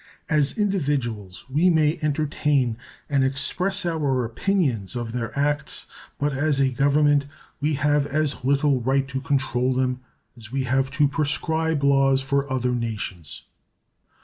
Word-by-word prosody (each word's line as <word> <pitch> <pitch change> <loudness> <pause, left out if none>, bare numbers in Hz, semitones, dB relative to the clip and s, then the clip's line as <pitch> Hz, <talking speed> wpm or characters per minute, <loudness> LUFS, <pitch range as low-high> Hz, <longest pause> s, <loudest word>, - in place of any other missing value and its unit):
As 150 +2 +2
individuals 140 - -1
we 155 +7 +3
may 160 -1 +2
entertain 145 -4 +1 0.3
and 140 -2 +2
express 180 +9 0
our 145 -7 0
opinions 125 - -1
of 120 -2 -3
their 115 -1 -3
acts, 145 +1 0 0.3
but 145 0 -1
as 145 +1 +1
a 135 -1 +3
Government 145 +2 +3 0.3
we 150 +1 0
have 145 +1 +1
as 150 -3 -1
little 140 0 +2
right 135 +2 +1
to 135 -1 -4
control 130 -2 0
them 130 0 0 0.4
as 115 -2 -12
we 135 0 -1
have 130 +1 +1
to 150 -1 +5
prescribe 160 +1 0
laws 135 -1 +4
for 140 0 -1
other 125 -1 0
nations. 105 -9 -4
140 Hz, 140 wpm, -24 LUFS, 130-150 Hz, 0.4 s, to